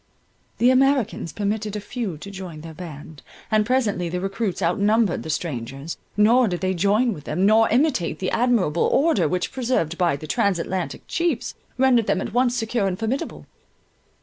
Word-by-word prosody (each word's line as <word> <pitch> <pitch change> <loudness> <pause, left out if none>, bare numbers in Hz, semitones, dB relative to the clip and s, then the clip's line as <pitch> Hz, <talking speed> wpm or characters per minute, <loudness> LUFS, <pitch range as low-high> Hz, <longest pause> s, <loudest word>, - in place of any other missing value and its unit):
The 245 +2 +5
Americans 260 - +2
permitted 210 +3 -2
a - - -2
few 210 -5 -4
to 200 +6 -9
join 185 -5 -8
their 160 0 -9
band, 155 -3 -10 0.3
and 215 -1 +3
presently 215 -9 +1
the 180 +2 -2
recruits 195 +1 -2
outnumbered 200 +3 +2
the - - -8
strangers—nor 165 - 0
did 175 -3 -3
they 190 0 0
join 205 +6 +2
with 150 -5 -11
them, 180 +6 0
nor 220 +2 +5
imitate 245 - +1
the 185 - -2
admirable 225 -10 +2
order 270 - +3
which, 180 +4 -1
preserved 235 - -1
by 175 -5 +2
the 150 - -8
Trans 190 +4 +1
Atlantic 180 +1 -3
chiefs, 335 -8 -1 0.2
rendered 250 -4 +3
them - - +2
at - - -5
once 245 0 +2
secure 225 -3 0
and 185 -1 -2
formidable. 225 +6 -3
200 Hz, 170 wpm, -23 LUFS, 170-235 Hz, 0.3 s, The